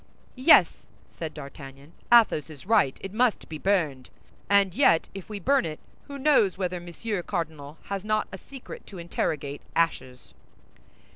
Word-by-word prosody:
"Yes," 255 - +5 0.3
said 160 -2 -6
D'Artagnan, 140 +1 -11 0.2
"Athos 220 -10 +5
is 150 -1 -12
right, 200 -10 +3
it 195 - -7
must 240 0 +1
be 155 -1 -7
burned. 155 -10 0 0.4
And 200 -2 +4
yet 165 -1 +3
if 195 0 -9
we 210 -1 -5
burn 275 +7 +2
it, 155 -1 -5 0.3
who 280 -1 -7
knows 265 -10 +3
whether 180 -2 -2
Monsieur 175 +4 -4
Cardinal 160 -5 -5
has 195 -1 -4
not 215 0 0
a 190 - -8
secret 270 +4 -11
to 195 - -10
interrogate 150 -4 -3
ashes?" 130 -6 -2
180 Hz, 150 wpm, -26 LUFS, 155-210 Hz, 0.4 s, Yes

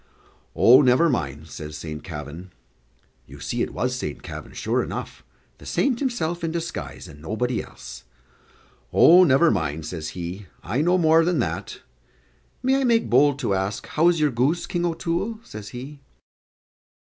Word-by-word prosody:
"Oh, 130 +4 +7
never 130 +5 +4
mind," 75 - -3
says 75 -1 -8
Saint 75 -1 -7
Kavin. 80 +2 -8 0.8
You - - -12
see - - -3
it - - -1
was 125 +1 -1
Saint 125 - -5
Kavin, - - -8
sure - - -1
enough - - -6 0.4
the - - -14
saint 255 -4 +1
himself 180 - -2
in 165 - 0
disguise, 170 +1 -5
and 75 -1 -13
nobody 110 +8 -2
else. - - -11 0.9
"Oh, 180 +2 +7
never 155 +1 +5
mind," 80 -5 -2
says 80 -1 -5
he, 90 +3 -6 0.2
"I 125 +7 -1
know 175 +3 +3
more 165 -1 +5
than 175 0 +1
that. 120 - -3 0.8
May 265 +1 +3
I - - +1
make 235 -3 +2
bold 140 +3 +4
to 115 -6 0
ask 95 +1 -2
how 160 +3 +3
is 175 -2 +3
your 150 -2 +2
goose, 145 +9 +1
King 175 -1 -1
O'Toole?" 170 +6 -2
says 105 - -9
he. 135 +4 -9
130 Hz, 160 wpm, -24 LUFS, -, 0.9 s, Oh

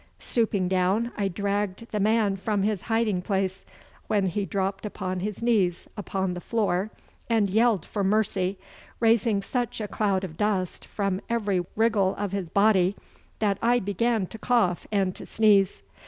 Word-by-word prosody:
Stooping 210 -6 0
down 190 +6 +1
I 200 -2 0
dragged 200 +2 -2
the 210 - -1
man 210 -1 +2
from 200 +1 -1
his 210 -2 0
hiding 225 -5 +1
place, 190 -1 -2 0.4
when 205 -2 +2
he 195 +2 -1
dropped 195 +3 -2
upon 185 -3 -4
his 210 +3 -4
knees 200 -7 +1
upon 190 -2 -2
the 180 - -6
floor 205 -3 0 0.4
and 215 -4 +2
yelled 220 -4 +3
for 205 - -3
mercy, 195 -2 +1 0.4
raising 225 -3 +3
such 245 0 -2
a 210 - -3
cloud 200 -2 0
of 160 -4 -6
dust 195 -4 -1
from 195 -2 -2
every 205 -6 0
wriggle 215 -4 +2
of 205 -2 -3
his 195 -4 -3
body 200 -2 +3 0.4
that 200 -2 0
I 240 +1 +4
began 215 +1 0
to 220 +4 -10
cough 220 -9 +1
and 195 -3 +1
to - - -9
sneeze. 205 -3 +3
200 Hz, 160 wpm, -26 LUFS, 190-220 Hz, 0.4 s, I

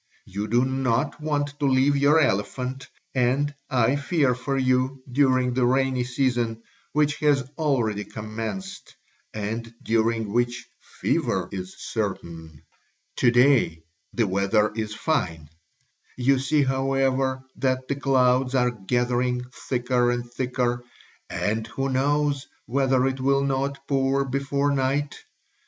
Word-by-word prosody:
You 100 +3 -4
do 120 +4 +3
not 130 +3 0
want 145 -1 -2
to 145 - +1
leave 135 +2 +3
your 145 +3 +4
elephant, 125 +3 -1 0.3
and 135 +3 +1 0.2
I 130 0 +2
fear 145 -3 +1
for 135 +2 -3
you 130 0 +1
during 130 -1 +2
the 130 0 +1
rainy 130 0 +2
season, 120 -3 -1 0.3
which 150 -1 +1
has 145 -4 +2
already 115 -9 0
commenced 110 - -6 0.4
and 110 +2 -4
during 110 -1 0
which 120 0 0
fever - - -1
is 95 -1 -6
certain. 85 -7 -5 0.5
To 125 - +4
day 120 - +3 0.3
the 115 - +1
weather 100 +2 +2
is 110 -1 -3
fine; 85 - -1 0.7
you 130 +1 +3
see, 145 +2 +2
however, 135 0 0
that 130 -1 0
the - - 0
clouds 130 -1 +2
are 125 -1 +3
gathering 125 +3 0 0.3
thicker 125 -1 +1
and 120 0 -2
thicker 125 -1 -1 0.5
and 110 +2 -1
who 135 +4 -3
knows 140 +1 +1 0.2
whether 130 0 +2
it 135 0 -1
will 140 +1 +2
not 135 0 -2
pour 135 0 +1
before 140 +2 0
night? 140 +1 0
130 Hz, 125 wpm, -25 LUFS, 120-135 Hz, 0.7 s, your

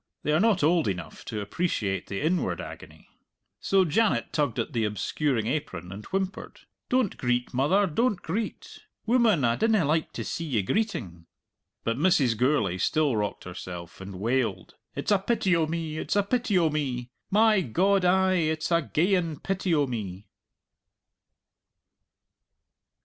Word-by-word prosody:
They 150 - 0
are 155 - +3
not 210 -5 +3
old 165 -3 +3
enough 90 -3 -5
to 105 -2 -4
appreciate 100 - -2
the 100 - -4
inward 170 +4 0
agony. - - -10 0.5
So 195 -1 +3
Janet 210 +7 +1
tugged 145 -7 0
at 155 - -2
the 115 -2 0
obscuring 110 - -1
apron, 95 - -3
and 100 +3 -8
whimpered, 190 0 -4 0.3
"Don't 250 -6 +1
greet, 125 -1 -1
mother, 150 +11 +3
don't 205 +5 0
greet. 210 +7 -5 0.3
Woman, 225 - +3
I 115 0 +2
dinna 220 -6 +2
like 155 +2 0
to - - -4
see 165 - -4
ye 120 -10 0
greetin'." 95 - -2 0.6
But 115 +3 -1
Mrs. 150 -9 +3
Gourlay 110 -7 +1
still 150 - +2
rocked 105 -1 -2
herself 90 -1 -8
and 95 -1 -8
wailed, 115 -1 -1 0.2
"It's - - -2
a 205 - +5
pity 195 -3 +1
o' 160 -2 +1
me, 160 -1 -3
it's - - -2
a 205 - +3
pity 230 -1 +1
o' 165 -3 +3
me! 125 -5 -3 0.2
My 215 0 +4
God, 190 - +2
ay, 185 +1 +3
it's 155 0 -1
a 170 0 +4
geyan 170 +1 0
pity 190 -1 -1
o' 145 -2 +3
me!" 105 -6 -5
155 Hz, 155 wpm, -27 LUFS, 115-190 Hz, 0.6 s, a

